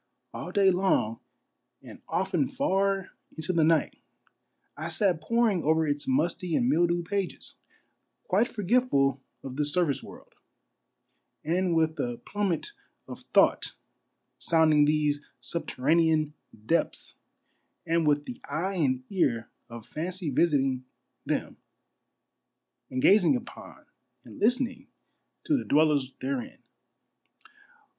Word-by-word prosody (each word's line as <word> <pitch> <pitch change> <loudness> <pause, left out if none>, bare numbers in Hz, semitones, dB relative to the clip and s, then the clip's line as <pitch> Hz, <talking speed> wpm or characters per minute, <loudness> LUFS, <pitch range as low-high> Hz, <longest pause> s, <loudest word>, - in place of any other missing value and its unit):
■ - - -50 0.3
All - - -6
day 195 -2 +4
long, 180 - +1 0.6
and - - -12
often 190 +8 0
far 195 -8 0 0.3
into 160 +3 -2
the 165 -2 +3
night, 160 0 +2 0.8
I - - -5
sat 185 -6 +1
poring 220 +1 +1
over 160 +1 +2
its 145 -1 -2
musty 165 +5 0
and 245 - +2
mildewed 175 -2 +2
pages, 200 0 -4 0.7
quite 205 +5 +2
forgetful 195 - +1 0.2
of 135 -1 -7
this 150 -1 +1
surface 170 -6 +1
world, - - -13 1.1
and 175 +2 0
with 160 -1 +1
the 120 -1 -2
plum 205 -1 -1
met 175 - -3 0.4
of - - -9
thought - - +3 0.6
sounding 155 -3 +4
these 150 -1 +1 0.2
subterranean 155 0 +1 0.3
depths, 165 +8 -1 0.7
and 165 -1 +1
with 145 0 +2
the 250 +1 -8
eye 190 +4 -2
and 130 -5 +1
ear 120 - 0 0.2
of 115 -2 -9
fancy 175 0 -4
visiting 135 -4 +1 0.4
them, - - -2 1.3
and 130 0 -3
gazing 205 +3 +5
upon 245 -1 -9 0.4
and - - -13
listening 250 +2 +1 0.6
to 310 - +1
the 265 - -1
dwellers 145 -3 +2
therein. 130 -2 -4
165 Hz, 120 wpm, -27 LUFS, 145-195 Hz, 1.3 s, gazing